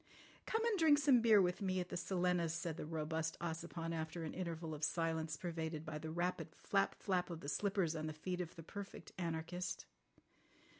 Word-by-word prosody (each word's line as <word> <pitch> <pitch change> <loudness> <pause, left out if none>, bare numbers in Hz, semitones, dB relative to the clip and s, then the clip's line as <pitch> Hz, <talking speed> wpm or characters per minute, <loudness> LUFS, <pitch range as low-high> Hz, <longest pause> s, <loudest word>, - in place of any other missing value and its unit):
"Come 450 +1 +1
and 440 -5 +2
drink 310 -3 +7
some 270 -4 +6
beer 220 -3 +7
with 180 +1 +2
me 185 -1 +1
at 180 0 -3
the - - -4
Silenus," 175 -2 +1
said 170 -2 -2
the 150 - -5
robust 160 0 -1
Ossipon 165 0 -3
after 160 +1 -3
an 155 - -4
interval 165 -3 -3
of 150 0 -6
silence 160 -1 0
pervaded 160 -2 -3
by 155 -1 -4
the 160 +1 -5
rapid 175 +3 -1 0.2
flap, 195 -1 +2
flap 185 -3 0
of 165 -2 -5
the - - -6
slippers 190 +1 +1
on 155 0 -2
the 155 - -3
feet 180 +4 -2
of 175 -1 -6
the 165 - -8
Perfect 200 +4 -7
Anarchist. 170 +1 -2
170 Hz, 195 wpm, -39 LUFS, 160-185 Hz, 0.2 s, drink